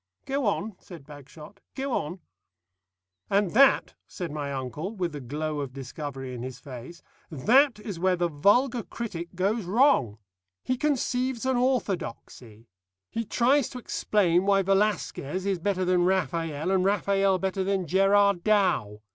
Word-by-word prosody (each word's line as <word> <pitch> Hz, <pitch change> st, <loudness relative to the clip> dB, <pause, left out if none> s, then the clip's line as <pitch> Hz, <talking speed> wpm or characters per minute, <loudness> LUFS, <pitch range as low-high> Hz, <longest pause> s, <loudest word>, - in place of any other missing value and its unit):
"Go 270 Hz, -3 st, -1 dB
on," 205 Hz, 0 st, -1 dB
said 165 Hz, -7 st, -12 dB
Bagshot, 150 Hz, +6 st, -13 dB, 0.2 s
"go 275 Hz, 0 st, -3 dB
on." 175 Hz, +1 st, -3 dB, 1.1 s
"And 200 Hz, -2 st, +2 dB
that," 275 Hz, +5 st, +4 dB
said 175 Hz, -5 st, -6 dB
my 145 Hz, -2 st, -4 dB
uncle, 140 Hz, -, -5 dB
with 180 Hz, -4 st, -2 dB
the 145 Hz, -1 st, -7 dB
glow 150 Hz, +4 st, -3 dB
of 135 Hz, -3 st, -5 dB
discovery 135 Hz, -1 st, -6 dB
in 120 Hz, -, -6 dB
his 130 Hz, 0 st, -6 dB
face, 130 Hz, +6 st, -10 dB, 0.3 s
"that 235 Hz, -, +3 dB
is 205 Hz, -5 st, -6 dB
where 185 Hz, +1 st, +2 dB
the 175 Hz, 0 st, 0 dB
vulgar 230 Hz, -, +2 dB
critic 185 Hz, -8 st, -7 dB
goes 200 Hz, +3 st, 0 dB
wrong. 190 Hz, -, +3 dB, 0.5 s
He 255 Hz, -, 0 dB
conceives 255 Hz, -3 st, -1 dB
an 260 Hz, 0 st, +1 dB
orthodoxy. 175 Hz, -, -3 dB, 0.4 s
He 230 Hz, -, -2 dB
tries 255 Hz, +5 st, +2 dB
to -, -, -8 dB
explain 195 Hz, -6 st, +1 dB
why 195 Hz, -1 st, +4 dB
Velasquez 190 Hz, -4 st, 0 dB
is 195 Hz, -3 st, 0 dB
better 185 Hz, +1 st, 0 dB
than 180 Hz, -1 st, +2 dB
Raphael 165 Hz, -2 st, -1 dB
and 190 Hz, -1 st, +2 dB
Raphael 195 Hz, -1 st, +2 dB
better 190 Hz, +1 st, -2 dB
than 195 Hz, -1 st, -1 dB
Gerard 195 Hz, +1 st, +3 dB
Dow. 185 Hz, -, +1 dB
185 Hz, 145 wpm, -27 LUFS, 150-210 Hz, 1.1 s, that